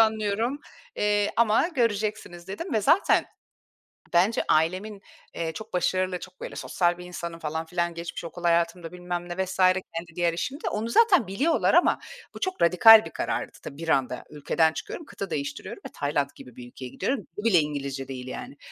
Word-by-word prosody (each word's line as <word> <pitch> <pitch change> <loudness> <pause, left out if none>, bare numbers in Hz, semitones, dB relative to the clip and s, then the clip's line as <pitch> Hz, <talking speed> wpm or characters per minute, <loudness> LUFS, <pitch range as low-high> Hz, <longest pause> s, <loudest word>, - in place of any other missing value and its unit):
anlıyorum, 220 +4 +1 0.4
eee, 205 0 +2
ama 230 +7 +4
göreceksiniz" 215 - -2
dedim 270 - -5
ve 220 - +2
zaten 330 - +4 0.9
bence 185 +6 +3
ailemin, 185 +6 +1 0.3
eee, 165 -1 -2
çok 220 +4 -9
başarılı, 185 +1 0
çok 185 0 -12
böyle - - -6
sosyal 175 -1 0
bir 180 - -9
insanım 170 -1 -6
falan 160 +1 -3
filan 170 0 -1
geçmiş 170 0 -6
okul 175 +1 -8
hayatımda 170 0 +1
bilmem 175 -1 -5
ne 190 +2 -1
vs. 190 +1 -7
kendi 185 -3 +1
diğer 170 -1 +1
işimde. 265 - -3
Onu 220 +2 -3
zaten 370 - +5
biliyorlar 275 - +1
ama - - +4 0.3
bu - - -9
çok 375 -1 -3
radikal 220 +6 +8
bir - - -8
karardı. - - -3
Tabii 140 - -8
bir 165 +1 -5
anda 135 -4 +1
ülkeden 155 +2 +1
çıkıyorum, 325 - -7
kıta 200 -8 -6
değiştiriyorum 140 -3 -5
ve - - -5
Tayland 145 -1 -1
gibi 125 - -13
bir 125 -1 -10
ülkeye 125 +1 -9
gidiyorum. 265 - -1 0.2
Dili 205 - -5
bile 200 -7 +5
İngilizce 140 -3 -3
değil 130 -1 -7
yani. 140 - -7
180 Hz, 175 wpm, -26 LUFS, 165-215 Hz, 0.9 s, radikal